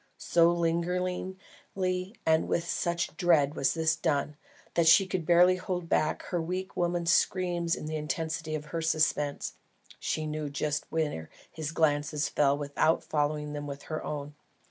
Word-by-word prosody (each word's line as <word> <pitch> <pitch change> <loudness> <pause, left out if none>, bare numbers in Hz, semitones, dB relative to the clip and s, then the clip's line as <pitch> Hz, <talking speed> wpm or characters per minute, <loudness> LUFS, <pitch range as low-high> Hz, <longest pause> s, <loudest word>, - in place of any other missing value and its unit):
So 170 0 +4
lingeringly 180 +2 -2
and 160 0 +3
with 170 0 -1
such 170 0 -1
dread 155 -5 +3
was 135 +2 +1
this 160 -1 +2
done, 150 -2 -1 0.4
that 170 -1 +2
she 190 +4 +7
could 185 -4 -3
barely 180 +1 +6
hold 180 -2 -4
back 155 0 +1
her 175 -3 -2
weak 185 +3 -4
woman's 175 -1 +1
scream 180 -2 +1
in - - -7
the 155 0 -3
intensity 155 +1 -3
of 150 -1 -5
her 165 - -1
suspense. 155 -2 0 0.5
She 155 - -2
knew 155 -1 -3
just 145 +1 -2
where 150 - -2 0.2
his 155 -1 -4
glances 150 -2 +1
fell 140 -1 +2
without 145 +3 +1
following 150 0 -1
them 145 0 -5
with 140 0 -7
her 155 -1 -4
own. 145 -1 -5
160 Hz, 155 wpm, -29 LUFS, 150-175 Hz, 0.5 s, she